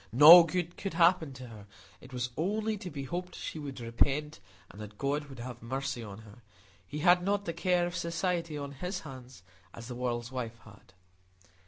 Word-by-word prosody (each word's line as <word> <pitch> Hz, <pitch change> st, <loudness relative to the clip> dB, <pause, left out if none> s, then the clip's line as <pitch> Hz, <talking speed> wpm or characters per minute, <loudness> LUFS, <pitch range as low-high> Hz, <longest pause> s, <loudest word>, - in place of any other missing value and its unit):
No 150 Hz, +9 st, +11 dB
good 175 Hz, +1 st, -3 dB
could 195 Hz, -4 st, -5 dB
happen 170 Hz, -3 st, +4 dB
to 130 Hz, -1 st, -9 dB
her; 105 Hz, -3 st, -12 dB, 0.3 s
it 125 Hz, -, -14 dB
was 125 Hz, -1 st, -3 dB
only 215 Hz, +6 st, -1 dB
to 190 Hz, -3 st, -7 dB
be 140 Hz, -4 st, -6 dB
hoped 180 Hz, +5 st, -5 dB
she 160 Hz, -, -6 dB
would 140 Hz, -3 st, -7 dB
repent, 135 Hz, +5 st, 0 dB, 0.3 s
and 105 Hz, -, -11 dB
that 105 Hz, -1 st, -10 dB
God 145 Hz, +4 st, -1 dB
would 135 Hz, -2 st, -12 dB
have 120 Hz, 0 st, -8 dB
mercy 135 Hz, +2 st, -3 dB
on 105 Hz, -1 st, -9 dB
her: 105 Hz, 0 st, -15 dB, 0.5 s
He 150 Hz, -, -6 dB
had 180 Hz, 0 st, +6 dB
not 200 Hz, +2 st, 0 dB
the 170 Hz, -, -3 dB
care 175 Hz, 0 st, +1 dB
of 175 Hz, 0 st, -5 dB
society 170 Hz, -2 st, -2 dB
on 140 Hz, -1 st, -5 dB
His 180 Hz, +6 st, -5 dB
hands, 130 Hz, -, -11 dB, 0.3 s
as 115 Hz, 0 st, -9 dB
the 125 Hz, -, -6 dB
world's 120 Hz, -1 st, -3 dB
wife 120 Hz, -3 st, -5 dB
had. 105 Hz, -3 st, -17 dB
140 Hz, 195 wpm, -30 LUFS, 120-175 Hz, 0.5 s, No